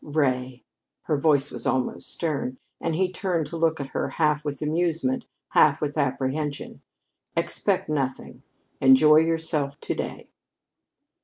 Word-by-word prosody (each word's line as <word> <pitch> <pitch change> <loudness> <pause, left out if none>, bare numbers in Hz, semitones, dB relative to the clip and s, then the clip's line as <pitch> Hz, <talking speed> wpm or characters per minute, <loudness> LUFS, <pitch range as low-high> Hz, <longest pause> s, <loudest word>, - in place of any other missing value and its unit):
"Ray!" 130 -4 -1 0.4
Her 155 - 0
voice 145 -1 +2
was - - -4
almost 130 -1 -1
stern, 140 -6 -3 0.2
and 165 -1 -1
he 185 +2 +1
turned 180 -4 -1
to 150 - -7
look 165 -1 +1
at 140 -1 -5
her - - -2
half 150 -2 +1
with 145 -2 -4
amusement, 170 +10 0 0.2
half 150 0 +4
with 145 -1 -2
apprehension. 140 +2 -2 0.6
"Expect - - 0
nothing. 135 -3 -3 0.4
Enjoy 140 +3 +7
yourself 160 -3 0
to - - -2
day." - - -6
150 Hz, 135 wpm, -25 LUFS, 135-160 Hz, 0.6 s, Enjoy